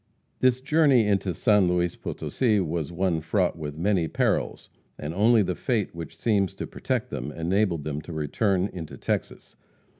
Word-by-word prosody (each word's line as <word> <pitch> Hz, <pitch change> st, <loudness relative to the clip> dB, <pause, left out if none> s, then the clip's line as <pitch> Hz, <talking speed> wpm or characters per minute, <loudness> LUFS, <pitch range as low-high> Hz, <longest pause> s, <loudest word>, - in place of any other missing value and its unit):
This 130 Hz, 0 st, +3 dB
journey 140 Hz, -5 st, +4 dB
into 100 Hz, -2 st, +1 dB
San 105 Hz, +2 st, +3 dB
Luis 90 Hz, -1 st, +1 dB
Potosi, 110 Hz, -5 st, -1 dB
was 85 Hz, -3 st, -2 dB
one 85 Hz, -2 st, 0 dB
fraught 90 Hz, +3 st, 0 dB
with 75 Hz, -2 st, -6 dB
many 90 Hz, -1 st, +1 dB
perils, -, -, -1 dB, 0.3 s
and 75 Hz, +2 st, -5 dB
only 110 Hz, +3 st, +4 dB
the 90 Hz, -1 st, -1 dB
fate 110 Hz, 0 st, -1 dB
which 80 Hz, -1 st, -8 dB
seems 100 Hz, -2 st, +1 dB
to -, -, -5 dB
protect -, -, -3 dB
them, 75 Hz, -, -4 dB
enabled 85 Hz, 0 st, 0 dB
them 75 Hz, 0 st, -3 dB
to 80 Hz, -, -10 dB
return 90 Hz, +5 st, 0 dB
into 85 Hz, -4 st, -7 dB
Texas. -, -, -4 dB
90 Hz, 160 wpm, -26 LUFS, 80-105 Hz, 0.3 s, journey